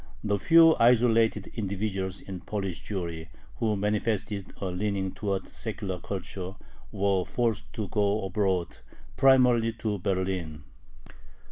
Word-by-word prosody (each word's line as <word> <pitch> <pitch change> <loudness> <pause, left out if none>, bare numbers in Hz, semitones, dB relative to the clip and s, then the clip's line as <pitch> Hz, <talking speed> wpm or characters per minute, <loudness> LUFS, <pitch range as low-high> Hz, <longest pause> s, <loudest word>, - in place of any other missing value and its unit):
The 100 -2 0
few 165 - +7
isolated 115 -3 +3
individuals 95 -2 -3
in 95 -2 -7
Polish 95 -5 -4
Jewry 85 -5 -4 0.3
who 110 -2 +1
manifested 105 -1 -1
a - - -3
leaning 95 0 -1
towards 100 -2 -3
secular 100 -5 -4
culture 95 +1 -6 0.4
were 95 -1 +1
forced 115 +1 -1
to 110 -3 -3
go 105 +1 0
abroad, 95 -5 -1 0.4
primarily 125 -4 +5
to 110 -2 -3
Berlin. 90 -5 -2
100 Hz, 115 wpm, -28 LUFS, 95-110 Hz, 0.4 s, few